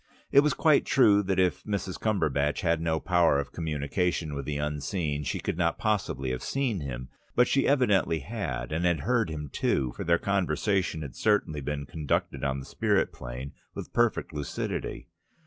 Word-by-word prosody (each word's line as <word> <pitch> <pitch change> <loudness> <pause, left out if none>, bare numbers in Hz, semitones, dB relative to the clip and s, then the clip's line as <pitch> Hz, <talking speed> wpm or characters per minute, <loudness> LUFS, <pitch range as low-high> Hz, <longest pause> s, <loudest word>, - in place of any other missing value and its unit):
It 140 - +7
was 150 +1 +3
quite 155 -3 +4
true 105 -6 +5
that 95 -2 -1
if 90 -1 +2
Mrs. 100 -3 -3
Cumberbatch 75 -9 +1
had 85 -4 +1
no 80 -1 0
power 85 -6 +3
of 70 - -4
communication 80 +1 -1
with 70 -1 -4
the 75 0 -2
unseen 75 +1 -2
she - - -2
could 85 - -3
not 85 -1 +1
possibly 95 - -1
have 65 - -3
seen 130 -8 -1
him. 65 -3 -6 0.3
But 125 0 +5
she 135 - +2
evidently 105 - +3
had, 75 - -4
and 80 +3 -1
had 85 -4 +2
heard 120 - +1
him 75 -2 -5
too, 65 -3 +1
for - - -4
their 85 0 +3
conversation 95 -3 0
had 70 - -8
certainly 100 -8 +1
been 70 +1 -3
conducted 75 -1 -2
on 70 -1 0
the 65 - -7
spirit - - +1
plane, 60 +3 -7 0.2
with - - -7
perfect 120 -7 +1
lucidity. 75 -3 -4
80 Hz, 180 wpm, -28 LUFS, 70-100 Hz, 0.3 s, It